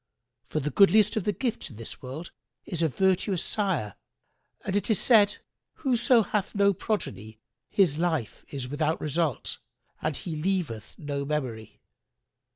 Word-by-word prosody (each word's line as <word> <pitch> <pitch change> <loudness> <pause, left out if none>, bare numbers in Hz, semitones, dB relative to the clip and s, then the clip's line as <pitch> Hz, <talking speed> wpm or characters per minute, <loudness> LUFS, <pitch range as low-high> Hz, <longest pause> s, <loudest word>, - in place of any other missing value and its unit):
For 155 - -1
the 150 +1 -2
goodliest 205 +5 +5
of 215 - -1
the 210 - +3
gifts 235 +1 -2
in 120 - -12
this 115 +1 -8
world 135 +7 -7 0.3
is 170 -2 -3
a 165 - +4
virtuous 190 - +1
sire, 185 - -1 0.7
and 195 - -1
it 205 +1 0
is 220 - +4
said, 210 -4 +5 0.4
'Whoso 250 -3 +3
hath 205 0 -2
no 200 0 +4
progeny 140 - -3 0.3
his 165 -7 +3
life 160 -11 -1
is 135 -3 -4
without 150 +3 0
result 155 -2 -1 0.4
and 155 -2 -1
he 165 -3 -5
leaveth 155 - -2
no 145 -2 -3
memory.' 130 -7 -4
170 Hz, 150 wpm, -27 LUFS, 140-200 Hz, 0.7 s, goodliest